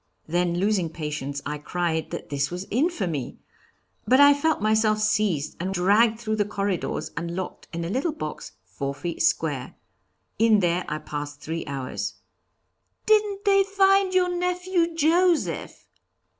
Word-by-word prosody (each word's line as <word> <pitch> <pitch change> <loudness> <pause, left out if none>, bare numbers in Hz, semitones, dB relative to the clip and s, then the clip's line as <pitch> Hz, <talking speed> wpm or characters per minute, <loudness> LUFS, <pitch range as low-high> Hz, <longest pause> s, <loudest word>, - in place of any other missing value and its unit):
Then, 175 +1 0
losing 190 -3 +1
patience, 150 -3 -5
I 150 +1 -3
cried 160 0 -2
that - - -7
this 140 0 0
was 180 +2 -5
infamy! 205 - -1 0.7
But 260 +4 +5
I 285 0 +8
felt 305 +2 +1
myself 215 0 +2
seized 210 -8 0
and 185 +3 -2
dragged 215 +5 +3
through 215 -2 -2
the 210 - +3
corridors 200 -2 -2
and 170 +2 -4
locked 185 0 -6
in 170 0 -4
a - - -4
little 275 +9 0
box 155 - -7
four 140 +10 -5
feet 170 +3 -4
square. 145 -5 0 0.6
In 220 -2 +5
there 175 -1 +1
I 150 - -2
passed 145 -1 -6
three 165 0 -4
hours." 135 -2 -4 0.9
"Didn't 420 -1 +2
they 395 -1 +5
find 390 -1 +3
your 360 -1 +2
nephew 360 -1 0
Joseph?" 335 +2 +1
200 Hz, 145 wpm, -25 LUFS, -, 0.9 s, I